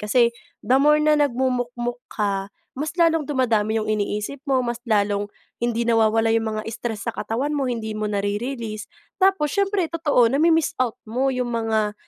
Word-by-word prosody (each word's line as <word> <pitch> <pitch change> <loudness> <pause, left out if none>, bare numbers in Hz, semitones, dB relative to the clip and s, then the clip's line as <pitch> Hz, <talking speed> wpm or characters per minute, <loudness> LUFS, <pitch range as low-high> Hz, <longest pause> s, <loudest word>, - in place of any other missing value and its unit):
kasi 235 +3 +3 0.3
the 260 +2 +4
more 300 +1 +5
na 300 -1 +4
nagmumukmok 245 -3 -1
ka, 200 -2 -2 0.3
mas 300 +4 -3
lalong 325 -2 +4
dumadami 225 -6 +1
yung 215 - -3
iniisip 210 +5 -2
mo, 265 -1 +3
mas 235 -1 -3
lalong 205 -1 +1 0.3
hindi 235 -1 0
nawawala 225 -1 +3
yung 220 -1 0
mga - - -3
stress 225 -1 -5
sa 230 - -2
katawan 270 +7 -2
mo, 275 -3 0
hindi 220 -2 -3
mo 215 0 -2
nare-release. 215 +2 -3 0.3
Tapos, 380 -7 +3
siyempre 395 -2 +1
totoo 305 -6 +2
nami-miss 320 +5 +2
out 240 -4 -3
mo 255 +5 0
yung 250 -2 -2
mga 220 -2 0
235 Hz, 165 wpm, -23 LUFS, 215-275 Hz, 0.3 s, more